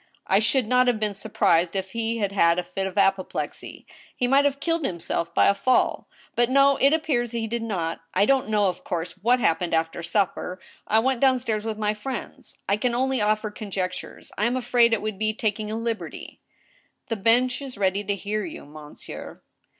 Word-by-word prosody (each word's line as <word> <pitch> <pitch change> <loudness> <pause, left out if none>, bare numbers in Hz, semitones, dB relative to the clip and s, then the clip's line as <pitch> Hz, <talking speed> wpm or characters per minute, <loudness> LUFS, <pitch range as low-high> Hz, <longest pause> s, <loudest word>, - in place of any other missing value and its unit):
I 195 - +3
should 220 +4 +2
not 250 +1 +3
have 240 -3 +2
been 210 -1 -1
surprised 180 -4 +1
if 190 0 -3
he 230 0 -2
had 200 -3 -1
had 170 -3 +3
a 180 - 0
fit 190 +2 -3
of 190 +1 -8
apoplexy. 195 -1 -1 0.3
He 245 - 0
might 275 +3 +4
have 280 -1 +1
killed 330 0 -1
himself 170 -4 -2
by - - +5
a - - +5
fall;... 250 +6 +1 0.3
but 240 0 +2
no, 275 +1 +5
it 275 - +4
appears 290 -7 +1
he 230 -1 -2
did 235 +1 -3
not. 175 -7 -3
I 195 +2 +4
don't 265 -3 +2
know, 210 -2 +3
of 180 -1 -3
course, 170 0 -3
what 240 +6 +1
happened 165 -5 +1
after 165 +1 -1
supper. 185 0 -1 0.3
I 220 - +3
went 255 +2 +2
down 265 -1 +5
stairs 220 -4 -2
with 220 -1 -3
my 210 -1 0
friends.... 235 +2 -7
I 200 - +2
can 240 +2 0
only 260 -1 0
offer 215 0 +1
conjectures.... 190 -3 -5
I 210 - +2
am 245 +2 +1
afraid 240 -1 +3
it 225 - 0
would 215 -2 -4
be 215 0 0
taking 215 -1 -2
a 220 - -3
liberty 230 -1 -5 0.2
— - - -35
" - - -34
" - - -52
The 225 - 0
bench 240 +5 +2
is 270 -5 -8
ready 195 0 +1
to 200 0 -1
hear 205 +2 -3
you. 325 - -8
monsieur 150 0 -10
215 Hz, 210 wpm, -25 LUFS, 195-245 Hz, 0.3 s, by